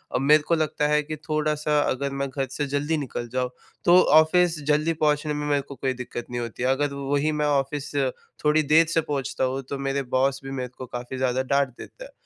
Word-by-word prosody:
अ, - - +4
मेरे 150 +3 +5
को 170 - +1
लगता 150 -2 0
है 150 0 +3
कि 155 +1 -5
थोड़ा-सा 150 -1 0
अगर 140 +1 -1
मैं 140 - 0
घर 135 0 -3
से 145 +2 -2
जल्दी 145 +3 -1
निकल 125 -4 -4
जाऊँ 130 -1 0 0.4
तो 175 +1 +7 0.2
ऑफिस 165 +1 +4
जल्दी 150 +2 +2
पहुँचने 150 -1 +1
में 150 0 -3
मेरे 145 -1 +2
को 140 - -11
कोई 130 -1 -1
दिक्कत 125 -1 -6
नहीं 120 0 -3
होती 120 +1 -5
है। 130 - +2
अगर 140 +1 +1
वही 140 +2 0
मैं 150 0 0
ऑफिस 145 0 -1 0.5
थोड़ी 150 +1 +4
देर 155 +3 +5
से 165 - +3
पहुँचता 140 -3 -3
हूँ 130 +1 -1
तो 140 - -3
मेरे 135 0 -1
बॉस 135 +1 +2
भी 135 - -7
मेरे 130 -2 -4
को 130 - -6
काफ़ी 125 +1 -6
ज़्यादा 130 0 0
डाँट 140 0 +1
देते - - -11
हैं। - - -14
145 Hz, 225 wpm, -25 LUFS, 135-150 Hz, 0.5 s, तो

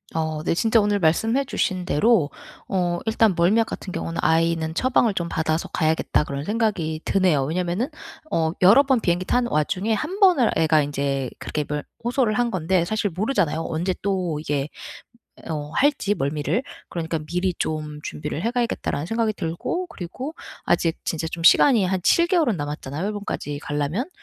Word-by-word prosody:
어. 155 -1 -2
네 - - +1
진짜 225 +4 +3
오늘 205 0 +1
말씀해 225 - +2
주신 185 -8 -1
대로 185 -2 +3 0.4
어 175 -2 0
일단 220 -2 +3
멀미약 210 +7 +3
같은 185 - -6
경우는 165 0 -4
'아이는 165 -1 +1
처방을 240 +2 +2
좀 170 -3 -2
받아서 160 0 -1
가야겠다.' 160 -2 +1
그런 140 0 -4
생각이 200 -6 -1
드네요. 180 -8 +2
왜냐하면은 180 - -1 0.4
어 160 - +1
여러 205 +10 +7
번 265 -3 +2
비행기 175 -3 0
타는 245 +4 +1
와중에 185 +8 0
한 320 - -3
번을 355 - +5
애가 155 -1 +4
인제 140 -2 -2
그렇게 150 - -3
뭘 150 0 -3 0.2
호소를 240 -2 +1
한 240 +2 +1
건데 185 -1 +1
사실 205 +2 -1
모르잖아요, 185 - 0
언제 175 +4 -1
또 185 -6 -1
이게 145 -2 -2 0.8
어 150 -2 -4
할지 275 -7 +2
멀미를? 150 - -1 0.3
'그러니까 165 -1 -3
미리 180 +4 -1
좀 150 -1 -3
준비를 150 +2 -5
해 230 - 0
가야겠다.'라는 235 - -1
생각이 225 +1 0
들고, 195 - -3
그리고 255 - -7 0.3
아직 165 -1 +2
진짜 160 0 -2
좀 165 0 -6
시간이 225 +3 +6
한 185 +1 0
7 340 0 +4
개월은 325 - +2
남았잖아요, 145 +1 -4
일본까지 205 -8 -4
가려면. 145 - -2
180 Hz, 365 characters per minute, -23 LUFS, 155-225 Hz, 0.8 s, 여러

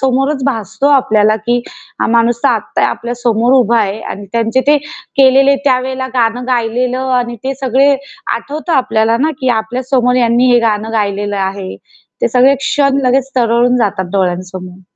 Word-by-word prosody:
समोरच 270 +1 0
भासतो 270 +1 -1
आपल्याला, 215 -6 +3
की 240 +2 -1 0.4
हा - - +1
माणूस 235 0 +2
तर - - +5
आता 220 -3 -1
आपल्या 240 +1 -4
समोर 235 0 +1
उभा 235 -3 +3
आहे 205 +1 -2
अन 200 - -7
त्यांचे 230 +2 +1
ते 295 +1 +5 0.4
केलेले 270 +1 +5
त्यावेळेला 260 0 0
गाणं 245 0 0
गायलेलं 250 +2 -1
आणि 240 -1 -3
ते 270 +1 -2
सगळे 270 +2 +2 0.4
आठवतं 300 +8 -5
आपल्याला 225 -5 +1
ना 310 +3 +1
की 260 - 0
आपल्या 240 +4 -5
समोर 250 -2 +2
यांनी 245 +1 +2
हे 240 - +5
गाणं 220 -1 -1
गायलेलं 205 -1 -2
आहे. 190 0 -4 0.5
ते - - +3
सगळे 260 +2 +4
क्षण 275 0 0
लगेच 265 +1 +1
तरळून 240 +1 +2
जातात 205 -4 -1
डोळ्यांसमोर. 185 -1 -3
240 Hz, 160 wpm, -14 LUFS, 220-260 Hz, 0.5 s, तर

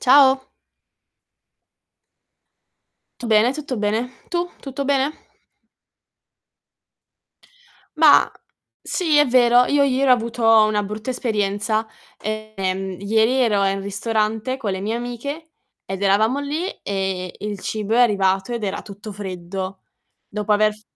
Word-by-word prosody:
Ciao. 265 0 +6 2.8
Tu - - -6
bene, 220 +2 +4
tutto 275 -3 -5
bene. 215 +4 -1 0.2
Tu? 350 0 -1
Tutto 275 0 -5
bene? 275 +1 +1 2.9
Ma, 310 -3 +6 0.5
sì, 325 -5 0
è 295 - +6
vero. 245 -1 +5
Io 285 +2 +2
ieri 275 0 +2
ho - - +9
avuto 235 0 -3 0.2
una 210 -1 0
brutta 215 +4 -6
esperienza. 215 -2 -1 0.3
Ehm, 195 -3 -3
ieri 220 +3 +2
ero 205 -5 +2
in 195 0 0
ristorante 215 +4 -1
con 220 -7 -3
le 190 0 -4
mie 215 +3 -2
amiche, 245 +7 -6 0.3
ed 195 +1 -5
eravamo 215 +6 +3
lì, 300 +6 -3
e 190 -2 -3
il 210 -1 -5
cibo 215 +3 -2
è - - +4
arrivato, 195 -2 +2
ed 235 -2 -4
era 195 0 -3
tutto 205 +1 -9
freddo. 190 -1 -6 0.5
Dopo 210 0 -3
aver 215 0 +3
f 215 - -19
215 Hz, 125 wpm, -21 LUFS, 200-255 Hz, 2.9 s, ho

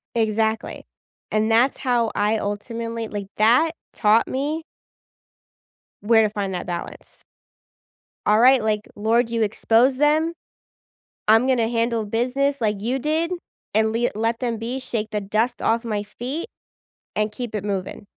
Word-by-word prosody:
Exactly, 220 0 -1 0.4
and 215 +1 +1
that's 240 +4 +3
how 240 -4 +1
I 210 +2 +2
ultimately 230 +2 -4
like, 205 -2 -5
that 245 +10 +4 0.2
taught 215 +1 +3
me 295 +5 -2 1.4
where 225 +1 +5
to 215 - +3
find 200 -2 -3
that 180 - -4
balance. 175 -1 -7 1.0
All 210 +1 +4
right, 255 0 +6
like, 215 -1 0
"Lord, 230 +3 +1
you 230 -1 0
expose 225 +4 +3
them, 305 +4 +2 0.9
I'm 225 +3 +6
gonna 245 -4 +2
handle 230 -2 0
business 260 +6 0
like 210 -3 0
you 245 +5 0
did, 315 +5 0 0.4
and 220 0 +3
le 240 +2 +1
let 225 +2 0
them 235 -3 -2
be, 235 +4 -4
shake 220 -4 -3
the 210 - -1
dust 215 +5 -1
off 230 +1 +1
my 210 -2 -1
feet, 250 - -5 0.7
and 215 0 0
keep 235 0 -6
it 205 - -3
moving." 200 -1 -4
225 Hz, 145 wpm, -23 LUFS, 215-250 Hz, 1.4 s, right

